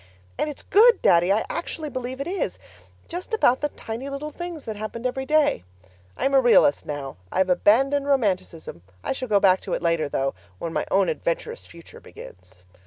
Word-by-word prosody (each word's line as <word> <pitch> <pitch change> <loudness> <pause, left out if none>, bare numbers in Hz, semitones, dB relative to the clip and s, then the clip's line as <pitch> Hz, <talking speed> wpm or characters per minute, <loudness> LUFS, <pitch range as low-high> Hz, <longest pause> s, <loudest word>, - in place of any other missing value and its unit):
And 305 - 0
it's 295 - -8
good, 455 +2 +5
Daddy, 175 +2 +4
I 215 +3 +2
actually 320 -3 -5
believe 255 +1 -5
it 275 - -3
is 375 +2 -3 0.5
just 365 +6 -4
about 255 - +3
the 295 - 0
tiny 240 +1 -7
little 285 +2 -5
things 345 -2 -7
that 220 - -5
happened 215 +3 -6
every 265 +1 -2
day. 300 - +2 0.5
I'm 275 - 0
a 270 - +6
realist 235 - +4
now. 140 -5 -5
I've 185 -1 +1
abandoned 270 +10 +3
romanticism; 190 - -1 0.2
I - - -1
shall 260 -1 -5
go 205 -3 +3
back 190 -1 +4
to - - -5
it - - -2
later 165 -3 +1
though, 135 -1 -1 0.2
when 165 - -5
my - - -2
own 195 0 +3
adventurous - - -3
future 170 -1 -14
begins. 90 0 -14
245 Hz, 185 wpm, -24 LUFS, 180-295 Hz, 0.5 s, a